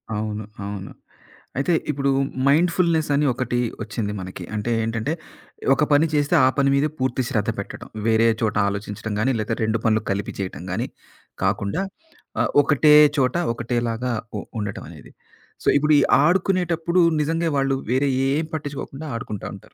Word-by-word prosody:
అవును 105 0 -3 0.2
అవును. 100 -1 -6 0.7
అయితే, 140 +6 +1 0.2
ఇప్పుడు 140 -1 -1 0.4
మైండ్‌ఫుల్‌నెసని 160 -1 +2
ఒకటి 120 0 -1 0.2
ఒచ్చింది 105 -1 -3
మనకి. 90 -1 -7
అంటే, 110 +3 -2
ఏంటంటే, 115 +6 -1 0.6
ఒక 150 - +2
పని 145 +3 +5
చేస్తే 145 -1 +2
ఆ - - +6
పని 140 -1 +3
మీద 140 +2 +2
పూర్తి 130 0 0
శ్రద్ధ 110 0 0
పెట్టడం. 100 - -7 0.2
వేరే 115 0 +4
చోట 110 -2 0
ఆలోచించడం 105 +2 -5
గానీ, 130 +5 +2
లేతే 105 - -1
రెండు 110 +1 0
పనులు 110 -1 +2
కలిపి 100 +1 -3
చేయటం 90 -2 -5
గాని 115 +7 -2 0.6
కాకుండా 100 - 0 0.6
ఆహ్, - - +1
ఒకటే 150 +1 +4 0.2
చోట, 130 0 +2 0.2
ఒకటేలాగా 120 +1 -2 0.3
ఉ - - -4 0.2
ఉండటం 105 -1 -4
అనేది. - - -13 0.5
సో, - - -5
ఇప్పుడు 150 +1 +3
ఈ - - +4 0.2
ఆడుకునేటప్పుడు, 175 0 +2 0.2
నిజంగా 165 +2 0
వాళ్ళు 135 0 +1
వేరే 135 +2 +2 0.2
ఏం 155 +3 0
పట్టించుకోకుండా, 145 0 -6
ఆడుకుంటా 115 -4 -5
ఉంటారు. - - -16
130 Hz, 145 wpm, -23 LUFS, 110-150 Hz, 0.7 s, ఆ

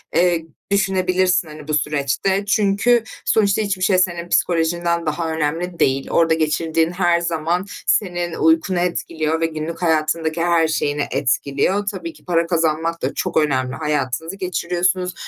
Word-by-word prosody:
eee, 175 -2 +2 0.3
düşünebilirsin, 185 -2 +2
hani, 150 -1 -11
bu 155 - -2
süreçte. 150 +7 0
Çünkü 210 +3 +2 0.2
sonuçta 205 -1 +2
hiçbir 200 -3 -2
şey 185 0 +3
senin 175 -1 0
psikolojinden 170 0 +1
daha 160 +2 -2
önemli 165 +3 -2
değil. 135 0 +1
Orada 165 -1 +3
geçirdiğin 160 +1 0
her 175 -1 +2
zaman 170 +2 -1 0.2
senin 175 -4 0
uykunu 160 +3 +2
etkiliyor 160 -2 -1
ve - - +3
günlük 165 +1 -5
hayatındaki 160 0 0
her 170 -2 +3
şeyini 145 -2 -1
etkiliyor. 140 +9 0
Tabii 335 -1 -7
ki - - -21
para 170 -2 +1
kazanmak 165 0 0
da - - -2
çok 185 - -2
önemli. 130 -4 +1
Hayatınızı 150 +2 -2
geçiriyorsunuz 180 0 -1
170 Hz, 140 wpm, -20 LUFS, 155-180 Hz, 0.3 s, şey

